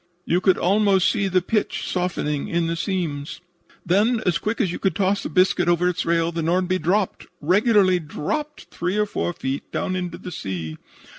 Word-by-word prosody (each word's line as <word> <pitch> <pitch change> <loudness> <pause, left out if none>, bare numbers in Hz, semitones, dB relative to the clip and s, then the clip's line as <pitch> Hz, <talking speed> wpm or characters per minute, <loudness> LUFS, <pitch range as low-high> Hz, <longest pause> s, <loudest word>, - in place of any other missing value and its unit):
You 175 +2 +1
could 190 -1 +4
almost 195 0 +3
see 200 -3 0
the 185 -1 +1
pitch 215 +2 -1
softening 170 -5 -2
in 170 0 0
the 165 0 -1
seams. 165 -6 -3 0.5
"Then, 210 +7 +3
as 175 -5 +2
quick 210 +6 -2
as 195 -8 +1
you - - -5
could 190 -4 0
toss 200 +1 +1
a - - -2
biscuit 180 -1 +3
over 175 +1 +3
its 180 -2 -1
rail, 165 0 +2
the 165 0 -3
Nordby 180 +3 +1
dropped 190 +3 0
regularly 190 +2 +3
dropped 295 - -4
three 180 +4 -2
or 210 - +3
four 200 - -2
feet 135 -5 -5
down 185 - -2
into 180 -2 -4
the 180 - -8
sea. 85 - -5
180 Hz, 190 wpm, -23 LUFS, 165-195 Hz, 0.5 s, could